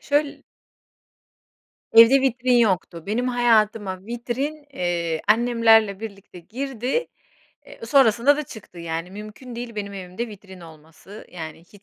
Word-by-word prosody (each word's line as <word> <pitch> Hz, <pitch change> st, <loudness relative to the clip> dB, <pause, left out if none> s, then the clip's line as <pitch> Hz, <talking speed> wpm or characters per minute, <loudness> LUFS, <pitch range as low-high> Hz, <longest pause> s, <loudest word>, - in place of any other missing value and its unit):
Şöyl 290 Hz, 0 st, -1 dB, 1.5 s
Evde 230 Hz, +4 st, +8 dB
vitrin 255 Hz, -1 st, +2 dB
yoktu. 185 Hz, -7 st, +1 dB
Benim 240 Hz, +5 st, -1 dB
hayatıma 215 Hz, -5 st, +1 dB
vitrin, 260 Hz, +6 st, -4 dB
eee, 170 Hz, -5 st, -2 dB
annemlerle 225 Hz, -3 st, +4 dB
birlikte 200 Hz, -4 st, -9 dB
girdi, 255 Hz, -, -3 dB, 0.6 s
eee, -, -, -14 dB
sonrasında 255 Hz, +1 st, +4 dB
da 300 Hz, -, -2 dB
çıktı. 210 Hz, -8 st, -12 dB
Yani 165 Hz, +1 st, -5 dB
mümkün 215 Hz, +5 st, -10 dB
değil 240 Hz, -1 st, -6 dB
benim 200 Hz, -1 st, -5 dB
evimde 190 Hz, +5 st, -6 dB
vitrin 190 Hz, -3 st, -13 dB
olması 165 Hz, +5 st, -14 dB
yani 160 Hz, -3 st, -8 dB
hiç 190 Hz, +4 st, -20 dB
220 Hz, 120 wpm, -23 LUFS, 185-245 Hz, 1.5 s, Evde